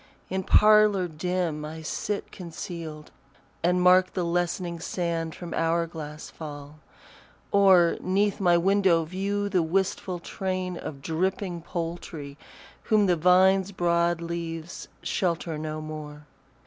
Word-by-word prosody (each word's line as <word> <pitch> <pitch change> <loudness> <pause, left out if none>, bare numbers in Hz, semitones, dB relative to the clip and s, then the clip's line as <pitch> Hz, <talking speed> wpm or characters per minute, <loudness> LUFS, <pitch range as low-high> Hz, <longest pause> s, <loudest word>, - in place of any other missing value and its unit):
In 190 0 0
parlour 210 -1 +5
dim 170 -1 -2
I 160 +1 -7
sit 205 +5 -3
concealed, 165 -3 -7 0.5
And 180 +1 +2
mark 185 0 +5
the 180 - 0
lessening 175 0 -1
sand 165 -2 -2
from 175 -2 -7
hour 165 +1 +1
glass 155 -2 -8
fall; 145 -1 -9 0.7
Or 190 -4 +5
'neath 200 +2 +1
my 175 -3 +4
window 185 -2 +3
view 200 +4 -2
the 190 -3 +2
wistful 185 +2 -1
train 185 +1 -3
Of 140 -5 -7
dripping 180 +2 -2
poultry, 165 -4 -5 0.5
whom 215 -2 +4
the 180 -2 +3
vine's 185 +3 +4
broad 170 -2 +1
leaves 170 -1 -5 0.2
Shelter 170 -3 -1
no 155 0 -4
more. 150 -1 -8
175 Hz, 120 wpm, -26 LUFS, 160-185 Hz, 0.7 s, parlour